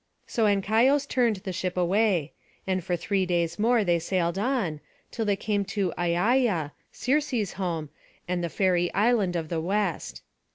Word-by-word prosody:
So 230 -3 0
Ancaios 225 +8 +3
turned 240 -5 +2
the 190 -1 -6
ship 185 0 -3
away; 180 -3 +1 0.3
and 185 -2 -1
for 180 0 -1
three 190 +3 0
days 170 0 -1
more 230 +1 +3
they 175 -3 +2
sailed 170 +1 -1
on, 210 - -1 0.3
till 225 - -2
they 205 -1 +2
came 205 0 -1
to 200 -3 -1
Aiaia, 175 - +1 0.2
Circe's 255 -6 0
home, 165 -6 -3 0.4
and 175 -1 -1
the 170 - -1
fairy 175 -1 +1
island 210 -4 +2
of 160 -2 -3
the 165 -2 -1
West. 195 0 -2
190 Hz, 160 wpm, -26 LUFS, 175-220 Hz, 0.4 s, Ancaios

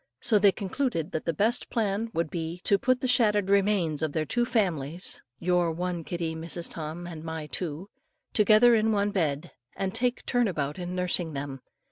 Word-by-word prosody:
So 215 -3 +4
they 200 -1 +6
concluded 190 - -2
that 160 - -3
the 165 - +1
best 215 +9 0
plan 220 -1 -1
would 165 -5 -2
be 165 0 -4
to 200 - +3
put 255 +3 +1
the 260 - 0
shattered 210 -5 +3
remains 195 -6 +2
of 155 -2 -1
the 155 -1 0
two 240 +8 0
families, 175 - -1 0.2
"Your 175 -1 +1
one 175 0 -3
kitty, 170 -1 -3
Mrs. 165 +1 -4
Tom, 160 +2 -6
and 165 -3 -8
my 160 -1 -5
two," 165 +2 -4 0.5
together 215 +3 +6
in 220 0 +3
one 205 -1 +1
bed, 160 -4 -1 0.2
and 190 -1 -2
take 245 +1 0
turn 245 -2 +2
about 150 -3 -2
in 180 0 -4
nursing 180 -3 0
them. 140 -1 -5
180 Hz, 185 wpm, -27 LUFS, 160-210 Hz, 0.5 s, they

